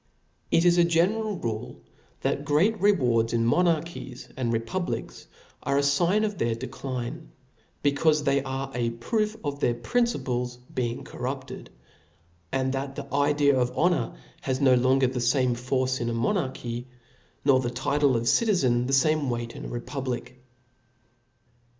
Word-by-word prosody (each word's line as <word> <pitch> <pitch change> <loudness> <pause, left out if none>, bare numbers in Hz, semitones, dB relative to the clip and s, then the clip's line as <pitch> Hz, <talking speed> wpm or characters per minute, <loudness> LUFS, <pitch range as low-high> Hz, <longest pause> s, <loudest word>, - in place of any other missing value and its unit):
It 165 - +3
is 175 0 +5
a - - +7
general 190 +5 +1
rule, 110 -7 -4 0.4
that - - -1
great 195 +9 +2
rewards 125 - +3
in 115 -1 +2
mo^ 120 +10 +3
narchies 165 -6 -2
and 125 -3 -1
republics, 115 +11 -3 0.3
are 140 +1 0
a - - +4
fign 175 +9 +2
of 205 -3 -4
their 115 -1 +1
decline; 130 +5 -5 0.5
becaufe 150 +1 +3
they 140 -1 +2
are 135 0 -4
a 120 -1 0
proof 215 - -1
of 145 -1 -3
their 120 -4 +1
principles 125 - -1 0.2
being 120 -2 -2
corrupted, - - -6 0.8
and 130 0 0
that 135 0 -3
the 140 -1 -7
idea 145 0 +3
of 125 0 -1
honor 165 -9 +1 0.3
has 130 -1 -1
no 135 -2 +5
lon 130 +2 +3
ger - - +5
the 125 0 -1
fame 125 +1 +2
force 130 +2 -1
in 120 0 -1
monarchy, 125 - -2 0.6
nor 135 -2 +5
the 125 -2 -1
title 135 +2 +1
of 115 +1 -2
citizen 130 - +3
the 135 - -1
fame 150 +1 +3
weight 120 -1 -3
in - - -7
a - - -5
republic. 125 0 -5
135 Hz, 150 wpm, -26 LUFS, 120-160 Hz, 0.8 s, a